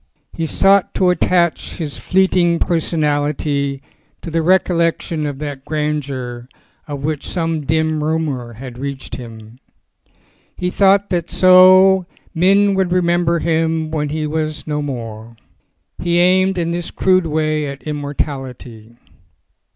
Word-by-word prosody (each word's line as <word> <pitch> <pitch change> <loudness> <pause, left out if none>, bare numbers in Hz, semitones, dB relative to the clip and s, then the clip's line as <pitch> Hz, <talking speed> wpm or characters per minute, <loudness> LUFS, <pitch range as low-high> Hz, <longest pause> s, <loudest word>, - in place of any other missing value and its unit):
So - - -45 0.2
he 165 - 0
sought 195 +3 +3
to 180 -1 +3
attach 175 -2 0
his 155 -4 -5
fleeting 180 -2 +2
personality 145 -4 -1 0.4
to 165 - -6
the 165 +1 +1
recollection 170 -3 +1
of 145 -2 -5
that 145 -2 -6
grandeur 140 -5 -4 0.4
of 145 -2 -6
which 150 -1 -3
some 165 -4 -2
dim 160 0 0
rumour 150 -7 -2
had 125 +1 -10
reached 140 0 -6
him. 115 -1 -11 1.0
He 180 0 -2
thought 200 +1 +3
that 175 -2 -1
so 185 0 +6 0.3
men 195 +4 +3
would 190 -2 0
remember 175 -1 +2
him 160 -1 0
when 150 -2 -2
he 155 +1 -2
was 155 0 -3
no 150 -1 -2
more. 115 -5 -6 0.7
He 175 0 +1
aimed 185 +2 +3
in 170 -1 -1
this 175 0 -3
crude 185 -2 +2
way 155 -1 -1
at 140 0 -8
immortality. 135 -6 -5
155 Hz, 130 wpm, -18 LUFS, 140-175 Hz, 1.0 s, so